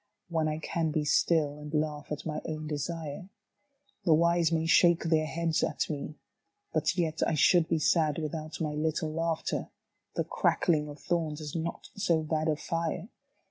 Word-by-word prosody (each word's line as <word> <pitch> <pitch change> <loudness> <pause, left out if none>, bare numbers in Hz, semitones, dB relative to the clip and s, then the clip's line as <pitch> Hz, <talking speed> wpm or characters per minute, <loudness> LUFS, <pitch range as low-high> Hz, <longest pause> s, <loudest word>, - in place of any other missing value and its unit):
When 160 -2 +1
I 155 0 -1
can 160 +1 -1
be 155 -1 0
still 150 -1 +2
and 150 0 -8
laugh 150 -1 -2
at 150 - -4
my 155 -1 -3
own 155 -1 -4
desire? 155 +2 -4 0.7
The 165 -4 +5
wise 170 0 +3
may 160 -1 +1
shake 170 +1 +5
their 160 -1 +2
heads 165 0 0
at - - -1
me, 150 +1 -5 0.6
but - - +1
yet 160 -2 0
I 160 - +1
should 170 +2 +5
be 165 - +1
sad 155 -1 +2
without 155 0 -4
my 155 -2 -1
little 155 0 -1
laughter. 165 0 -1 0.5
The - - +1
crackling 150 -4 +1
of 145 - -8
thorns 160 -4 -1
is 150 0 -6
not 165 0 -4
so 170 -5 +1
bad 155 0 -1
a 155 - +2
fire. 165 +5 -3
160 Hz, 175 wpm, -30 LUFS, 150-165 Hz, 0.7 s, The